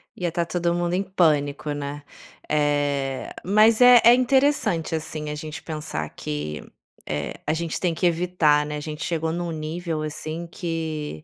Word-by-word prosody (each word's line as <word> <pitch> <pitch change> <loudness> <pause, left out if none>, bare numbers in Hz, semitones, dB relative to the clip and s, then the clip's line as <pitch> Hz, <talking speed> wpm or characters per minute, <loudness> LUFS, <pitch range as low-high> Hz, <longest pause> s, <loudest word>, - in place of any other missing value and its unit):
Ia 175 -1 -2
estar 170 +1 -1
todo 170 0 0
mundo 175 0 -1
em 190 +2 +1
pânico, 150 -6 +1
né. 145 0 -5 0.5
Eh, 145 -2 0
mas 215 +4 +5
é 245 -1 +9
é 235 - +9
interessante, 250 - +2
assim, 155 -1 -5
a 150 - -3
gente 155 +1 -7
pensar 150 - -4
que, 75 0 -5 0.5
eh, 75 -1 -3
a 150 - +1
gente 165 -1 -3
tem 175 -2 0
que 170 - -1
evitar, 165 -4 +2
né. 150 0 -4
A - - -4
gente 150 0 -6
chegou 160 -2 -1
em 170 - -3
um 175 -1 -3
nível, 160 +1 -4
assim, 155 +2 -5
que 160 - -4
160 Hz, 170 wpm, -24 LUFS, 150-175 Hz, 0.5 s, é